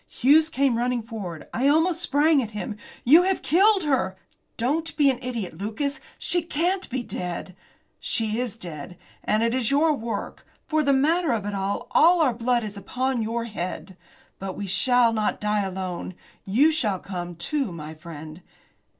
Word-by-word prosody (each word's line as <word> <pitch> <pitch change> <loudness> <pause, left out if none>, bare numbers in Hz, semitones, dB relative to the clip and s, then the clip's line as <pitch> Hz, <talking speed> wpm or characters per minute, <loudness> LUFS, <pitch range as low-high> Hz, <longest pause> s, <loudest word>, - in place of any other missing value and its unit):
Hughes 305 +5 +4
came 270 -6 +1
running 245 -1 0
forward. 200 -8 -7
I 255 +4 +1
almost 325 +4 +3
sprang 295 -1 +3
at 225 - -4
him. 210 - -4 0.3
"You 310 +8 +7
have 380 +1 0
killed 390 +3 +4
her!" 260 -11 0 0.4
"Don't 295 +8 -1
be 285 -3 +5
an 255 - -5
idiot, 230 -10 -5
Lucas! 275 +9 -3 0.2
She 350 - +1
can't 345 +4 -1
be 260 0 -2
dead!" 180 -2 -5 0.4
"She 220 -1 -1
is 245 -3 -3
dead. 170 -3 -8 0.3
And 215 +1 +1
it 230 0 +1
is 250 -4 +1
your 300 +3 +3
work. 230 -4 -5 0.2
For 310 0 +1
the 280 -2 +2
matter 310 +4 +2
of 220 -3 -1
that, 205 0 -4
all 195 0 -2 0.3
our 285 -7 +3
blood 240 +1 0
is 210 -1 -6
upon 255 +5 -2
your 230 +2 -2
head. 190 -3 -5 0.4
But 190 -1 -5
we 205 - -4
shall 230 +5 +3
not 215 -1 0
die 210 0 +1
alone. 185 -2 -4 0.3
You 260 +11 +4
shall 220 -11 +1
come, 175 -2 -6
too, 240 - -1
my 155 -2 -7
friend." 155 +1 -10
235 Hz, 170 wpm, -25 LUFS, 195-285 Hz, 0.4 s, You